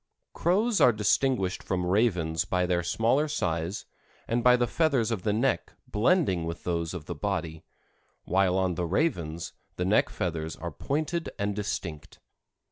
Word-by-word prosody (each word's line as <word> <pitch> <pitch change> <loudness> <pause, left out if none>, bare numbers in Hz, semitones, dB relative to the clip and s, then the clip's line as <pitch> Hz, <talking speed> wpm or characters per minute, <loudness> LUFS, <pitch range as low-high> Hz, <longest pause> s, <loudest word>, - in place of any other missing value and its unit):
Crows 205 +6 +2
are 125 - +7
distinguished 105 -2 +1
from 90 -2 -2
ravens 90 -5 +1
by 90 0 0
their 90 -1 +1
smaller 115 - +1
size, 90 - -2 0.4
and 120 +1 0
by 125 0 +7
the 120 - +2
feathers 130 -4 +1
of 110 -5 -1
the 105 - 0
neck 110 -3 0
blending 105 - +2
with 85 +1 -5
those 85 0 -2
of 80 -4 -7
the - - -4
body, 80 -2 -3 0.6
while 95 0 +2
on 95 -1 +1
the 85 +1 -2
ravens, 85 - -1 0.2
the - - -2
neck - - +3
feathers 80 -2 -3
are 85 +1 -6
pointed 155 - -2
and 100 0 -1
distinct. 90 -7 -5
95 Hz, 155 wpm, -28 LUFS, 85-120 Hz, 0.6 s, are